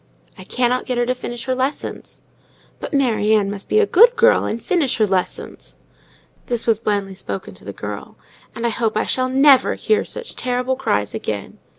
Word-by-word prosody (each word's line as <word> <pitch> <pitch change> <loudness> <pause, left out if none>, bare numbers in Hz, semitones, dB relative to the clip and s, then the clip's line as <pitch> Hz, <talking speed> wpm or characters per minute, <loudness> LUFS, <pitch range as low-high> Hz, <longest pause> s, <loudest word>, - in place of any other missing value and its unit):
"I 185 - -11
cannot 250 +3 0
get 250 -2 -1
her 240 - +2
to 255 - 0
finish 240 -2 -6
her 260 - -1
lessons." 260 +3 -4 0.6
"But - - -6
Mary 225 -6 +2
Ann 200 -2 +1
must 200 -1 -8
be - - +2
a 435 - +5
good 470 +5 +6
girl, 480 +1 +4
and 225 - -2
finish 330 - 0
her 220 - +3
lessons." 190 -2 -3 0.7
This 240 -2 -2
was 225 -2 +2
blandly 200 -3 -1
spoken 190 - -6
to - - -12
the - - -5
child. - - -7 0.4
"And 230 - -3
I - - +3
hope 225 -1 -1
I - - +1
shall 255 0 0
never 270 0 +5
hear 435 - +1
such 485 0 -8
terrible 250 +1 -1
cries 105 - -1
again!" 105 -2 -5
245 Hz, 195 wpm, -20 LUFS, 215-265 Hz, 0.7 s, good